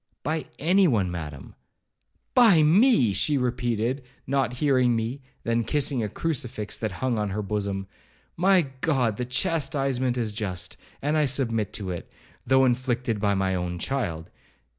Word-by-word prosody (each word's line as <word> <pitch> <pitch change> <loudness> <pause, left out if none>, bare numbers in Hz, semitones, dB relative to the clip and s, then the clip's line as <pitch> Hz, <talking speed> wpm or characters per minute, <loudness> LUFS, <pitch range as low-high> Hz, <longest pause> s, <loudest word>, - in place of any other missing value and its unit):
'By 155 +3 -2
any 185 +5 +4
one, 100 - +1
Madam.' 75 -5 -7 0.8
'By 215 -11 +6
me!' 160 - +5
she 145 +8 +2
repeated, 120 0 -1 0.2
not 135 -2 0
hearing 130 -2 +2
me; 115 +5 -3 0.2
then 115 0 +1
kissing 140 +1 0
a 105 - -2
crucifix 120 -7 -3
that 110 - -2
hung 125 -4 +1
on 105 -1 -1
her 105 +2 -3
bosom, 100 -1 -2 0.5
'My 185 +1 +4 0.2
God! 125 -9 +1
the 125 - -2
chastisement 135 -3 0
is 115 -3 -1
just, 100 -5 -3 0.3
and 150 +2 +1
I 150 - +3
submit 115 -6 0
to 95 -3 -3
it, 85 - -7 0.4
though 130 +1 +5
inflicted 125 -3 0
by 100 -1 +1
my 95 -1 0
own 90 -1 -2
child. 90 -9 -3
125 Hz, 150 wpm, -25 LUFS, 105-140 Hz, 0.8 s, By